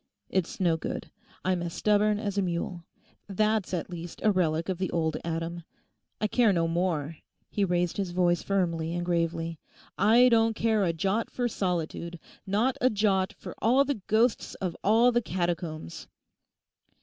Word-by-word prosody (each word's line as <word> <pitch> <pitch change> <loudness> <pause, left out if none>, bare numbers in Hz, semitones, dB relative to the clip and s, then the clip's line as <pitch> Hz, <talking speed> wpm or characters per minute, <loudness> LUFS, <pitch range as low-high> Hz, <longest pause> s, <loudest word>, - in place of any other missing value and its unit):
It's 185 -3 -1
no 170 -3 +2
good; - - -5 0.3
I'm 185 -1 +1
as 170 -1 -4
stubborn 210 0 +3
as 205 -2 -3
a 200 - +2
mule; 175 -1 -3 0.4
that's 215 +1 0
at 180 -1 -3
least 170 -1 -7
a 215 - +5
relic 165 -4 +1
of 185 -2 -2
the 185 - -1
old 160 -2 0
Adam. 165 +1 -3 0.6
I - - 0
care 225 0 +3
no 170 -3 +1
more,' 165 -3 -1 0.3
he 205 - 0
raised 175 -2 0
his 195 -3 -1
voice 175 -1 +2
firmly 170 -4 -1
and 175 0 -2
gravely—'I 170 +7 +1
don't 225 -1 +3
care 220 -2 +2
a 170 - +2
jot 195 +7 -1
for 245 -1 -1
solitude, 175 -4 -3 0.3
not 220 +7 +1
a 255 - +5
jot 200 -3 +1
for - - -8
all 255 +6 +4
the 280 -7 -2
ghosts 225 +2 +1
of 180 -3 -3
all 230 +4 +5
the 240 0 +2
catacombs! 170 - -3
185 Hz, 160 wpm, -28 LUFS, 170-215 Hz, 0.6 s, a